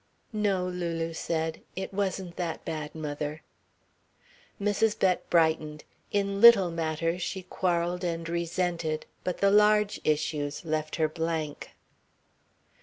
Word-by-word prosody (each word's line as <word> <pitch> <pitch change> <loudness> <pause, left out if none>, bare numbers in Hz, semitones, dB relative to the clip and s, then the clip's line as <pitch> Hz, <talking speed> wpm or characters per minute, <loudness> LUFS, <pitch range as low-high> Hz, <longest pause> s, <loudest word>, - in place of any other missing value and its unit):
"No," 200 -4 +1
Lulu 170 -2 -2
said, 160 0 -2
"it 190 +1 -5
wasn't 190 -3 -2
that 170 -3 -4
bad, 155 -1 -4
mother." 150 0 -4 1.2
Mrs. 210 +1 +1
Bett 185 -2 +1
brightened. 160 -2 +2 0.3
In 200 0 0
little 215 -7 +8
matters, 165 +1 -1
she 190 +2 -3
quarrelled 180 -1 -1
and 165 -1 -2
resented, 170 -2 -1 0.2
but 180 - -2
the 200 0 +3
large 210 0 +4
issues 150 0 -1
left 155 -1 -2
her 160 -1 +2
blank. 160 -2 -3
170 Hz, 115 wpm, -28 LUFS, 160-190 Hz, 1.2 s, little